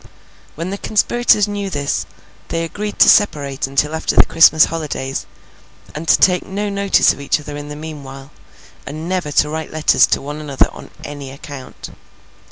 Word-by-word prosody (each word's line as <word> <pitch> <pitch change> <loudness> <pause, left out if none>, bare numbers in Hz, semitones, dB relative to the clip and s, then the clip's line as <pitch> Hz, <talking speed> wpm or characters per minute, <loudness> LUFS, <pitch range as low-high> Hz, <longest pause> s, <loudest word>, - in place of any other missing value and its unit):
When 170 +4 -5
the 200 - -5
conspirators 215 -1 +2
knew 205 -1 -4
this, 145 -5 -2 0.4
they 165 0 -2
agreed 205 +5 -5
to - - +6
separate 140 -10 +2
until 140 +3 0
after 160 - -2
the - - +7
Christmas 160 -1 +6
holidays, 145 -5 -4 0.7
and 160 +2 -7
to - - +5
take 180 -1 +3
no 205 +2 -4
notice 200 -1 +3
of - - -11
each 140 - 0
other 150 0 -8
in 145 0 -7
the 150 - -7
meanwhile, 140 -3 -9 0.6
and 155 +4 -6
never 180 -5 -2
to 150 - +3
write 160 0 -5
letters 155 0 +3
to - - +1
one 145 +2 -7
another 140 -3 +1
on - - -12 0.2
any 145 -2 -8
account. 140 -1 -10
155 Hz, 175 wpm, -18 LUFS, 145-185 Hz, 0.7 s, the